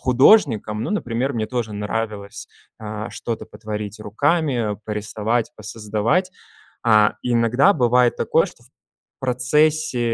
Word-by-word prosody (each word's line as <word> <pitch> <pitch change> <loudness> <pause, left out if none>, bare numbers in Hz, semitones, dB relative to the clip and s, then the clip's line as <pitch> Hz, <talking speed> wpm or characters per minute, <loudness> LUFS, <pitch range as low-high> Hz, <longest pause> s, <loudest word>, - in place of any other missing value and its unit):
художником, 125 - +4
ну, - - -3
например, 130 - -1
мне 110 -3 -2
тоже 115 -3 -3
нравилось, 105 0 -4 0.3
а, 110 +1 -6
что-то 115 -2 -5
потворить 105 -1 -6
руками, 120 -1 0
порисовать, 110 +2 -2
посоздавать. 110 - -1 0.5
А, 105 -3 +4
иногда 120 - +3
бывает 125 -4 +3
такое, - - +2
что - - -11
в - - -21 0.5
процессе, 135 +3 +1
115 Hz, 110 wpm, -21 LUFS, 105-130 Hz, 0.5 s, художником